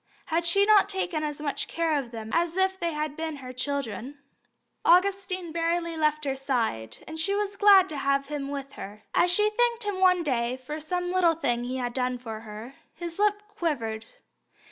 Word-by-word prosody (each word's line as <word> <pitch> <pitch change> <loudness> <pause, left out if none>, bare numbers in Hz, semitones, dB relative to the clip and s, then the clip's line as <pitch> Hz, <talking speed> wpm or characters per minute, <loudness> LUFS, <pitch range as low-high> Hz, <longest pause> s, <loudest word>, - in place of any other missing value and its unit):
Had 340 +1 +1
she 395 +4 +4
not 415 -2 +5
taken 360 -5 0
as 295 -1 -3
much 285 -2 -1
care 330 -2 0
of 255 -4 -6
them 225 -2 -7
as 340 +1 +1
if 380 0 +1
they 340 -1 -1
had 300 -1 -3
been 320 -1 -4
her 255 -2 -9
children? 275 0 -3 0.7
Augustine 370 -1 +2
scarcely 335 0 -1
left 305 -1 +1
her 270 -1 0
side, 230 - -2
and 320 0 -5
she 395 +5 +2
was 405 -1 -2
glad 395 -2 +7
to 305 - -5
have 275 0 +1
him 285 -1 -4
with 275 -1 -5
her. 205 +2 -9
As 355 - +4
she 420 +4 +3
thanked 475 +1 +1
him 410 -2 -2
one 365 -2 +4
day 250 -3 0
for 295 +4 -6
some 355 +3 -2
little 355 -3 +3
thing 240 -6 -1
he 255 +1 -3
had 245 -2 -3
done 250 -1 -1
for 225 -3 -7
her, 220 +3 -9 0.2
his 340 +1 -7
lip 415 0 +2
quivered. 230 - -3
310 Hz, 195 wpm, -27 LUFS, 260-365 Hz, 0.7 s, glad